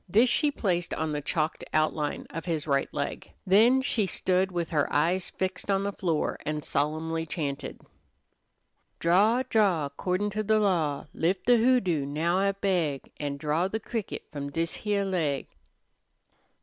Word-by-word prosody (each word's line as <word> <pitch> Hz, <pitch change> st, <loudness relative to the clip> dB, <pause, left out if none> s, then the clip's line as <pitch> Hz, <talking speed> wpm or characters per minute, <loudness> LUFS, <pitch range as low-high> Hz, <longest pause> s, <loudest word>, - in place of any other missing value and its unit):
This 225 Hz, +7 st, +5 dB
she 300 Hz, -, +3 dB
placed 180 Hz, -10 st, -1 dB
on 160 Hz, 0 st, -2 dB
the 150 Hz, 0 st, -2 dB
chalked 155 Hz, +2 st, -1 dB
outline 155 Hz, -1 st, 0 dB
of 165 Hz, -, -6 dB
his 160 Hz, -4 st, -2 dB
right 140 Hz, -2 st, 0 dB
leg. -, -, -4 dB, 0.2 s
Then 230 Hz, +8 st, +5 dB
she 220 Hz, -7 st, +1 dB
stood 185 Hz, +1 st, +1 dB
with 175 Hz, -2 st, -3 dB
her 150 Hz, -3 st, +1 dB
eyes 175 Hz, +5 st, +1 dB
fixed 190 Hz, +1 st, -3 dB
on 195 Hz, 0 st, +2 dB
the 200 Hz, -, -1 dB
floor 165 Hz, -6 st, -1 dB
and 150 Hz, 0 st, -3 dB
solemnly 160 Hz, +3 st, -1 dB
chanted: 145 Hz, -4 st, -4 dB, 1.2 s
"Draw, 210 Hz, +9 st, +3 dB
draw, 190 Hz, -, +2 dB
'cordin' 185 Hz, +7 st, -2 dB
to 215 Hz, +1 st, -1 dB
the 215 Hz, +1 st, +2 dB
law, 165 Hz, -9 st, +1 dB
Lif' 180 Hz, +3 st, 0 dB
the 245 Hz, 0 st, +5 dB
hoodoo, 220 Hz, -, +2 dB
now 165 Hz, +5 st, 0 dB
I 195 Hz, 0 st, +2 dB
beg, 180 Hz, -8 st, -1 dB
An' 145 Hz, -1 st, -3 dB
draw 155 Hz, +4 st, 0 dB
the 220 Hz, +3 st, -3 dB
cricket 225 Hz, -1 st, -4 dB
F'om 140 Hz, -1 st, -5 dB
this 165 Hz, +2 st, -1 dB
heah 205 Hz, -2 st, -1 dB
leg!" 160 Hz, -8 st, -1 dB
175 Hz, 160 wpm, -28 LUFS, 155-200 Hz, 1.2 s, This